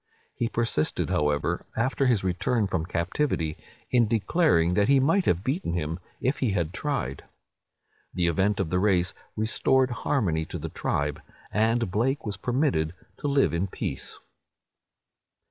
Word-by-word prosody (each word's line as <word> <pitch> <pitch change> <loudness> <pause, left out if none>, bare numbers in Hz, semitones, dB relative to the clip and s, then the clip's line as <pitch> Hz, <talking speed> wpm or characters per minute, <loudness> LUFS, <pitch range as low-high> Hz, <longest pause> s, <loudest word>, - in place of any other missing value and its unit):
He 120 - -1
persisted, 115 -11 0
however, 75 -1 0
after 130 +3 +1
his 115 -6 +2
return 95 +5 +1
from 90 -4 -2
captivity, 85 - -1 0.4
in 120 -3 +4
declaring 105 - +2
that 100 +2 +3
he 140 -1 +5
might 165 +8 +3
have 90 +2 +1
beaten 135 - -1
him, 80 0 -2 0.2
if 130 +4 0
he 120 -7 +1
had 85 -3 -1
tried. 135 - -3 0.9
The 90 - 0
event 95 +5 +1
of 90 -5 -1
the 90 - +2
race 90 -3 +2 0.2
restored 125 +4 +2
harmony 100 - 0
to - - -6
the - - -5
tribe, 75 0 -2 0.3
and 110 -1 +1
Blake 130 +7 0
was 105 -2 -2
permitted 120 - 0 0.2
to 145 - -3
live 140 - +3
in 85 +4 0
peace." - - -5
105 Hz, 145 wpm, -26 LUFS, 85-130 Hz, 0.9 s, he